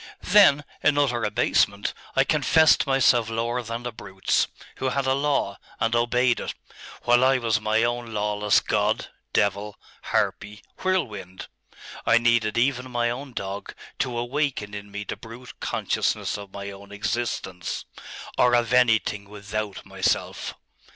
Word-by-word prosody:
'Then 180 -8 +5 0.2
in 145 -1 +3
utter 125 -5 +1
abasement, 105 -1 +1 0.2
I - - +5
confessed 155 -3 +4
myself 120 -4 +3
lower 115 +2 -1
than 115 +1 -5
the 120 - -4
brutes, 95 -3 -1 0.3
who 130 - -1
had 135 +1 -1
a 130 - +3
law, 140 -8 0 0.2
and 115 +1 +1
obeyed 120 +1 +2
it, - - -5 0.5
while 120 +1 +4
I 135 0 +5
was 115 -3 0
my 110 +1 +2
own 120 0 -1
lawless 105 -1 +2
God, - - 0 0.2
devil, 100 +1 0 0.3
harpy, 105 0 -1 0.2
whirlwind.... 105 - -2 0.5
I 115 - +5
needed 120 -2 +2
even 130 +1 +1
my 120 -1 0
own 130 +2 -6
dog 100 -1 -5 0.2
to 125 -2 -1
awaken 120 -4 -2
in 100 0 -7
me 105 0 -5
the - - -5
brute 115 +2 -11
consciousness - - -1
of 100 -2 -8
my 100 0 -6
own 100 +1 -12
existence, 105 -3 -3 0.5
or 125 -1 +5
of 120 0 +1
anything 110 -5 +2
without 105 0 -5
myself. - - -1
115 Hz, 145 wpm, -25 LUFS, 105-125 Hz, 0.5 s, Then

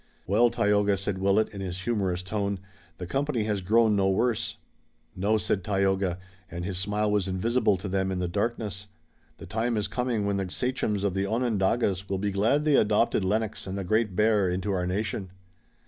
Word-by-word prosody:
"Well, 110 +6 +4
Tayoga," 105 -3 +2
said 100 0 -3
Willet, 100 +3 +2
in 100 -2 -8
his 90 -1 -5
humorous 95 -5 -1
tone, 100 0 -2 0.4
"the 90 - -5
company 135 +2 -1
has 105 -2 -1
grown 110 +3 +3
no 95 -1 +2
worse." 110 +1 0 0.6
"No," 100 +4 +2
said 100 -2 -1
Tayoga, 95 -2 +1 0.3
and 85 0 -5
his 95 -2 -3
smile 105 +2 0
was 105 -2 +1
invisible 105 +2 +1
to 100 +3 -6
them 95 0 0
in 95 - -2
the 90 -1 -1
darkness. 105 0 -3 0.5
"The - - -10
time 115 +2 -1
is 105 - 0
coming 120 -4 -1
when 100 -1 0
the 95 -2 -2
sachems 110 -2 -1
of 100 -3 +1
the 95 +1 -1
Onondagas 105 -3 0
will 95 - 0
be 100 +1 -1
glad 115 +10 +2
they 150 -2 +4
adopted 105 -1 +2
Lennox 105 +1 -1
and 95 +1 -4
the 100 - -3
Great 110 +1 +1
Bear 105 -2 +3
into 95 +3 -2
our 90 -2 -1
nation." 100 0 -2
100 Hz, 190 wpm, -27 LUFS, 95-110 Hz, 0.6 s, Well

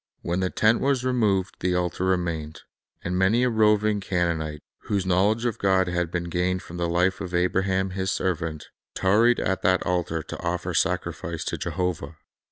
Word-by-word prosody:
When 85 +2 -1
the 95 -1 0
tent 110 +4 +2
was 135 -2 +1
removed, 105 -7 +1
the 90 0 0
altar 90 +1 -1
remained; 85 -4 -1 0.4
and 90 - -2
many 95 +6 +3
a 125 - +2
roving 105 -1 +3
Canaanite, 85 -5 -2 0.2
whose 100 -3 -1
knowledge 100 +6 +2
of 120 -4 -1
God 95 -2 +3
had 90 -1 -1
been 90 0 -2
gained 90 +2 -1
from 85 - -9
the 85 -1 -1
life 90 +3 +1
of 90 -2 -4
Abraham 95 +2 +1
His 95 0 -2
servant, 80 -4 -2 0.3
tarried 110 +6 +3
at 95 -1 -1
that 95 0 +2
altar 85 -3 -1
to - - -8
offer 90 +1 -2
sacrifice 85 -3 -1
to - - -2
Jehovah. 90 -5 -3
90 Hz, 175 wpm, -25 LUFS, 85-95 Hz, 0.4 s, many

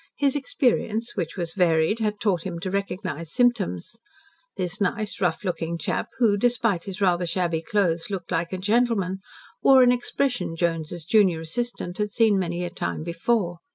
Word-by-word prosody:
His 280 -1 +1
experience, 240 -4 0
which 165 - -3
was 170 -2 -3
varied, 170 +2 +2
had 210 -2 -1
taught 190 -6 +1
him 180 -3 -4
to 185 - -3
recognize 185 -5 -3
symptoms. 225 - 0 0.6
This 180 +2 -2
nice, 210 +1 -1
rough 180 0 0
looking 170 -3 -2
chap, 165 - -2
who, 220 -5 +3
despite 230 -5 +1
his 195 +1 -7
rather 180 -2 +2
shabby 170 -1 0
clothes, 170 -2 0
looked 185 -3 -5
like 170 -1 -1
a 185 - -2
gentleman, 205 -2 +1 0.4
wore 265 -1 +7
an 245 - +6
expression 245 -5 -1
Jones's 165 -1 -2
junior 185 -4 +3
assistant 185 +1 -4
had 210 0 0
seen 215 -3 +3
many 175 -1 -2
a 175 - -4
time 85 - -3
before. 175 +1 -1
190 Hz, 165 wpm, -25 LUFS, 170-225 Hz, 0.6 s, wore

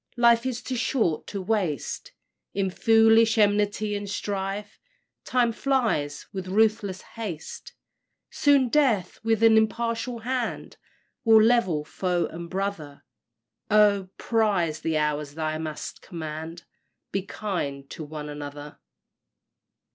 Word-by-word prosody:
Life 235 +1 +4
is 245 -2 -4
too 255 - -3
short 220 - 0
to 200 -2 -5
waste 185 - -2 0.4
In 195 -1 0
foolish 225 +2 +5
enmity 210 0 +2
and 205 0 -4
strife, 200 +1 -4 0.5
Time 245 -2 +2
flies 230 - 0
with 190 -1 -5
ruthless 205 -1 +1
haste; 200 -9 -7 0.6
Soon 280 -3 +4
death 230 -11 +2
with 225 0 +1
an 225 -1 +7
impartial 230 +2 0
hand 250 0 -3 0.5
Will 225 -1 +7
level 205 -10 +2
foe 180 +1 -1
and 170 +1 -7
brother, 185 -7 -4 0.7
Oh! 205 -3 +4
prize 195 -9 +1
the 160 -1 0
hours 150 -1 -1
thou 155 -1 -2
mayst 155 -1 -6
command 160 0 -7 0.5
Be 195 - 0
kind 155 -10 -4
to 160 - -6
one 150 0 -7
another! 145 0 -8
200 Hz, 115 wpm, -26 LUFS, 160-225 Hz, 0.7 s, an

